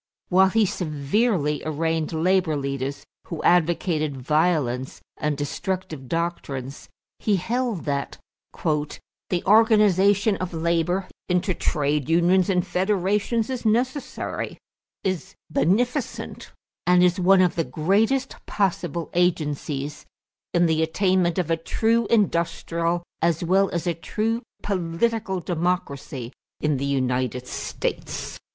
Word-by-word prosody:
While 190 +1 +5
he 220 +2 +3
severely 155 - 0
arraigned 160 +1 -1
labor 175 0 +2
leaders 140 0 -3 0.2
who 165 - -5
advocated 165 -4 +2
violence 140 -3 0 0.2
and 150 -1 -1
destructive 155 -1 -4
doctrines, 145 -5 -4 0.3
he 210 - +2
held 230 +1 -1
that 140 -2 -2 0.4
"the 155 +3 -3
organization 205 -1 +4
of 185 -2 -4
labor 170 +3 0 0.2
into 180 +1 +1
trade 150 -3 0
unions 175 +3 +4
and 180 -2 +2
federations 205 +4 0
is 255 -2 -4
necessary, 250 +5 -1 0.5
is 185 -5 -3 0.2
beneficent, 225 +11 0 0.4
and 180 0 +6
is 180 +1 +3
one 185 +1 +5
of 180 -2 +3
the 165 - 0
greatest 205 - 0
possible 175 -4 -1
agencies 150 -4 -1 0.4
in 175 0 +3
the 160 -1 +2
attainment 180 +1 +2
of 175 -3 0
a 165 - +3
true 225 +7 +1
industrial, 170 -4 +1 0.2
as 170 0 +1
well 190 +3 +3
as 170 0 -3
a 175 - +1
true 225 +7 -2 0.2
political, 195 +2 -1
democracy 155 -8 -2 0.3
in 150 -2 +1
the 135 - -2
United 130 -2 0
States." - - -4
175 Hz, 115 wpm, -24 LUFS, 150-195 Hz, 0.5 s, and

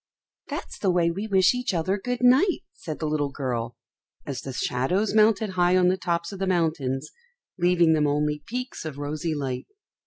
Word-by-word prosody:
"That's - - -6
the 195 - +1
way 175 -2 +3
we 200 +5 -4
wish 190 -1 +4
each 250 -6 -2
other 175 +4 +1
good 245 +3 -3
night," 270 +10 +4
said 155 -3 -7
the 160 - -4
little 150 -2 0
girl, 120 -4 -3 0.5
as 140 - -4
the 135 - -6
shadows 135 - 0
mounted 215 -1 +4
high 180 0 +3
on 180 -1 +4
the 185 - +2
tops 170 -2 -2
of 195 - -8
the 195 - -1
mountains, 155 -6 0 0.5
leaving 175 -2 +4
them 150 -1 +2
only 150 +1 0
peaks 250 +2 -5
of 155 -3 -6
rosy 155 +3 -3
light. 130 -3 -4
170 Hz, 185 wpm, -25 LUFS, 145-195 Hz, 0.5 s, wish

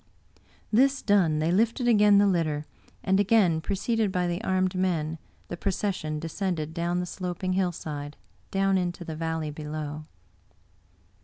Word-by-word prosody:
This 270 +5 +3
done, 185 -7 +3
they 155 +2 +1
lifted 230 +6 +1
again 210 -3 +6
the 205 - +5
litter, 160 -6 0 0.4
and 190 0 +2
again, 200 -6 +3
preceded 205 +3 0
by 180 -1 0
the 175 +4 -2
armed 185 -2 +1
men, 165 -4 -1 0.3
the - - -5
procession 180 -4 -2
descended 165 -1 -3
down 170 +1 -1
the 180 - -2
sloping 180 +1 -3
hillside, 155 -6 -3 0.3
down 195 0 +2
into 175 -1 -3
the 160 - -5
valley 160 -1 -2
below. 150 0 -6
180 Hz, 140 wpm, -27 LUFS, 160-195 Hz, 0.4 s, again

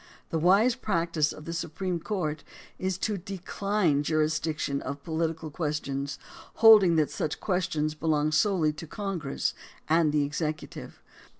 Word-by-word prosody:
The 160 - 0
wise 200 +9 +5
practice 170 -8 0
of 150 - -10
the 165 - -4
Supreme 170 +2 -3
Court 160 -6 -3 0.4
is 185 -1 -1
to 205 0 -2
decline 190 -3 0
jurisdiction 155 -2 0
of 140 0 -6
political 160 -1 -2
questions, 145 -3 -3 0.4
holding 210 -6 +7
that 155 -2 +2
such 150 - -3
questions 160 -5 -1
belong 155 -1 0
solely 160 -2 +2
to 155 +2 -9
Congress 180 -7 -3 0.3
and 160 -1 +3
the 150 -1 +2
executive. 150 +2 -5
160 Hz, 130 wpm, -28 LUFS, 150-185 Hz, 0.4 s, holding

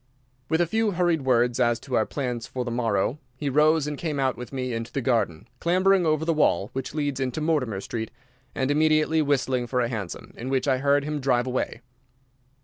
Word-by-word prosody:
With 160 +2 +2
a - - +4
few 220 +3 0
hurried 175 -3 +1
words 120 -2 +2
as 120 -2 +2
to 135 - -9
our 110 - +2
plans 125 -4 -3
for 125 -1 -4
the 120 - -3
morrow 115 +2 0 0.2
he 140 +1 -3
rose 155 +2 +4
and 150 -1 -4
came 155 -4 -2
out 130 -1 +1
with 125 - -8
me 130 -2 -3
into 115 +1 -4
the 140 - -2
garden, 115 -11 0
clambering 185 +1 +3
over 155 0 +1
the 165 - +2
wall 105 - +2
which 135 +2 -5
leads 145 -3 -1
into 130 +2 -2
Mortimer 145 -10 0
Street, 110 +1 -4 0.5
and 130 +1 0
immediately 155 +1 +3
whistling 130 -4 0
for 125 +1 0
a 120 -1 +1
hansom, 105 -7 -6
in 125 +3 -6
which 135 +1 0
I 130 -2 +2
heard 140 +1 +3
him 150 0 -3
drive 130 -2 +1
away. 125 -2 -2
135 Hz, 210 wpm, -25 LUFS, 120-155 Hz, 0.5 s, a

